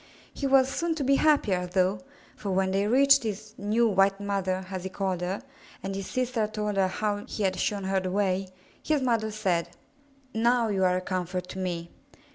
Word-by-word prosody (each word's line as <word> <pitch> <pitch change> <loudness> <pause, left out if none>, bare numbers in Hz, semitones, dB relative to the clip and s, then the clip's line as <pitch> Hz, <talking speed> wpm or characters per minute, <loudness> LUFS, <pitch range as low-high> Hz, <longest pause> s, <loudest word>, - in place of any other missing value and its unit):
He 280 - -2
was 265 -1 +5
soon 330 +4 -1
to 300 - -2
be 275 +1 +3
happier, 205 -13 +2
though, 185 +2 +1 0.4
for 205 - -5
when 190 0 +1
they 195 +2 +1
reached 275 +4 +6
his 215 -1 -5
*'new, 215 +4 +2
white 195 -1 +3
mother, 190 -2 -1
as 185 -2 -4
he 190 - -4
called 190 -2 -2
her, 190 +6 -3 0.4
and 195 0 -3
his 195 -1 -4
sister 250 -4 -1
told 210 -1 -3
her 190 -1 +4
how 205 +2 -1
he 215 - -3
had 185 -1 0
shown 205 -2 -1
her 190 0 +1
the 185 0 -3
way, 190 -1 0 0.3
his 300 -3 0
mother 230 -3 +1
said, 175 -5 -1 0.6
*'Now 235 +1 +2
you 195 -2 +1
are 180 0 +3
a - - -2
comfort 180 -1 -3
to 190 - -6
me. 170 -2 -3
200 Hz, 200 wpm, -27 LUFS, 185-225 Hz, 0.6 s, reached